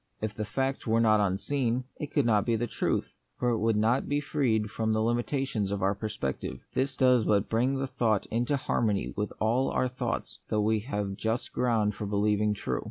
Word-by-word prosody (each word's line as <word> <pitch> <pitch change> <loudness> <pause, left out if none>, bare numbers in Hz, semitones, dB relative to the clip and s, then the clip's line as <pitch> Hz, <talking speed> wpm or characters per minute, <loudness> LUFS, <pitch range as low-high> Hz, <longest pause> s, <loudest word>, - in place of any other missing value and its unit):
If 110 -1 -3
the 105 0 -4
fact 135 +4 -2
were 115 +1 +3
not 110 -2 +4
unseen, 115 +6 0 0.2
it 150 0 -5
could 145 -4 +2
not 105 -3 +3
be 115 - +1
the 115 +2 0
truth; - - -1 0.2
for 125 - +1
it 115 -2 +1
would 115 0 +2
not 115 +5 +2
be 145 0 +2
freed 120 -8 0
from 110 -1 -1
the 110 - +1
limitations 120 -2 0
of 100 -1 -2
our 95 +1 +3
perception. 100 -11 -4
This 135 0 0
does 125 -3 +4
but 105 -1 +2
bring 125 +4 +2
the 135 - -1
thought 110 -5 0
into 120 +5 +1
harmony 110 -6 0
with 105 0 -2
all 120 +5 +2
our 130 - +1
thoughts 125 0 -4
that 105 - +1
we 110 +1 +2
have 105 -4 -3
just 115 +2 -2
ground 115 -4 +1
for 105 - -5
be 100 - -2
lieving 105 +1 +2
true. - - -2
110 Hz, 210 wpm, -29 LUFS, 105-125 Hz, 0.2 s, not